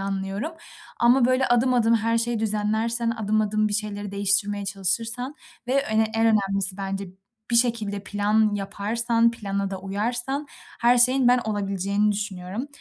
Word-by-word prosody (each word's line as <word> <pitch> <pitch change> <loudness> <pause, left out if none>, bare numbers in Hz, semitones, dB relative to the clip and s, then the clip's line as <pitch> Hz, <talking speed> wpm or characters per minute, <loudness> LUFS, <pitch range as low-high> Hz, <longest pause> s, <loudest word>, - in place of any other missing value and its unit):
anlıyorum 195 +8 -3 0.5
ama 240 +1 +5
böyle 255 +1 +2
adım 245 +1 +3
adım 230 -1 +3
her 230 +1 +1
şeyi 235 0 -1
düzenlersen, 220 +2 0
adım 215 -1 0
adım 215 0 +1
bir 205 - -5
şeyleri 205 -1 -3
değiştirmeye 200 +1 0
çalışırsan 225 +7 -2 0.3
ve 255 - -1
ö 275 - 0
en 220 +1 +2
önemlisi 195 -2 0
bence 195 0 -4 0.4
bir 235 - +3
şekilde 225 -4 0
plan 210 +1 +1
yaparsan, 230 +4 0
plana 200 -3 -3
da 190 -1 -5
uyarsan 235 +9 -3 0.3
her 240 +1 +4
şeyin 255 +1 +4
ben 250 +1 +5
olabileceğini 200 0 0
düşünüyorum. 200 +3 -4
215 Hz, 145 wpm, -24 LUFS, 200-235 Hz, 0.5 s, ama